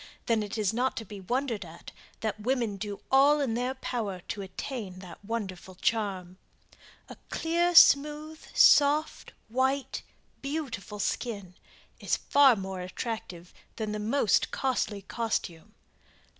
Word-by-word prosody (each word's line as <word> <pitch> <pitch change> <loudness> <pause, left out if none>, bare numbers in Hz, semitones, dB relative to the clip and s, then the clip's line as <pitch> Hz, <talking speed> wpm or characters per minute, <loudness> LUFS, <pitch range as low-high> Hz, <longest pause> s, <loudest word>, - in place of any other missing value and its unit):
Then 230 -2 +2
it 210 +1 -5
is 210 -1 +1
not 250 +3 0
to 225 - -4
be 205 0 -9
wondered 240 +1 -2
at 170 0 -12 0.3
that 215 -1 -2
women 235 -3 -1
do 205 0 -6
all 280 +3 +6
in 270 -6 0
their 250 +3 -1
power 220 -8 -3
to 205 - -3
attain 195 0 -6
that 185 +1 -11
wonderful 195 -4 -5
charm. 190 -3 -2 0.7
A - - -10
clear, 340 +2 0
smooth, 300 +1 +5
soft, 295 +2 +5 0.2
white, 265 +4 0 0.4
beautiful 275 - -4
skin 200 -3 -3 0.5
is - - 0
far 280 -3 +5
more 190 -2 -5
attractive 180 -2 -6 0.2
than 215 -2 -3
the 210 - -3
most 220 0 +2
costly 230 -6 -1
costume. 195 -8 -3
225 Hz, 130 wpm, -28 LUFS, 195-265 Hz, 0.7 s, all